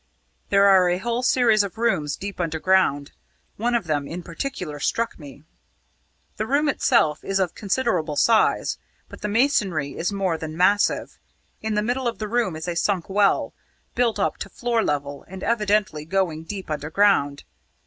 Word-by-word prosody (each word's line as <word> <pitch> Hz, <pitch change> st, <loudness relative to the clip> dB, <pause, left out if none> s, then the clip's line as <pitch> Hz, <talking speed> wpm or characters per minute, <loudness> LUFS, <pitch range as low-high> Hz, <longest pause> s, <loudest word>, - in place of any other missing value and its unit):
There 200 Hz, 0 st, +5 dB
are 190 Hz, -2 st, +6 dB
a 175 Hz, -, +1 dB
whole 235 Hz, +5 st, -2 dB
series 240 Hz, -4 st, +4 dB
of 200 Hz, +1 st, -5 dB
rooms 155 Hz, -11 st, 0 dB
deep 200 Hz, -1 st, -7 dB
underground. 160 Hz, -3 st, +1 dB, 0.5 s
One 240 Hz, +3 st, 0 dB
of 230 Hz, -6 st, 0 dB
them 145 Hz, -3 st, -1 dB
in 175 Hz, +2 st, -6 dB
particular 170 Hz, -, -5 dB
struck 230 Hz, +9 st, -1 dB
me. 145 Hz, -1 st, -12 dB, 0.9 s
The 215 Hz, +1 st, -2 dB
room 285 Hz, +4 st, +2 dB
itself 230 Hz, -, +2 dB
is 195 Hz, -, -1 dB
of 185 Hz, -3 st, 0 dB
considerable 200 Hz, -, -1 dB
size, 225 Hz, +7 st, +2 dB, 0.3 s
but -, -, -12 dB
the 210 Hz, -, -2 dB
masonry 205 Hz, -, +1 dB
is 175 Hz, -, -2 dB
more 190 Hz, -5 st, -1 dB
than 160 Hz, 0 st, -6 dB
massive. 200 Hz, +3 st, +2 dB, 0.4 s
In 220 Hz, -1 st, -2 dB
the 210 Hz, -, +1 dB
middle 245 Hz, +3 st, -1 dB
of 235 Hz, -, -2 dB
the 215 Hz, -, -4 dB
room 230 Hz, -6 st, 0 dB
is 160 Hz, +2 st, -6 dB
a 175 Hz, -, -2 dB
sunk 190 Hz, 0 st, -1 dB
well, 200 Hz, 0 st, +2 dB, 0.4 s
built 235 Hz, -3 st, +1 dB
up 200 Hz, -, 0 dB
to 195 Hz, -, -6 dB
floor 235 Hz, +1 st, -1 dB
level 145 Hz, -1 st, -2 dB
and 190 Hz, +1 st, -9 dB
evidently 210 Hz, -8 st, 0 dB
going 165 Hz, -2 st, -1 dB
deep 190 Hz, -2 st, -6 dB
underground. 150 Hz, -1 st, +1 dB
195 Hz, 170 wpm, -23 LUFS, 160-220 Hz, 0.9 s, are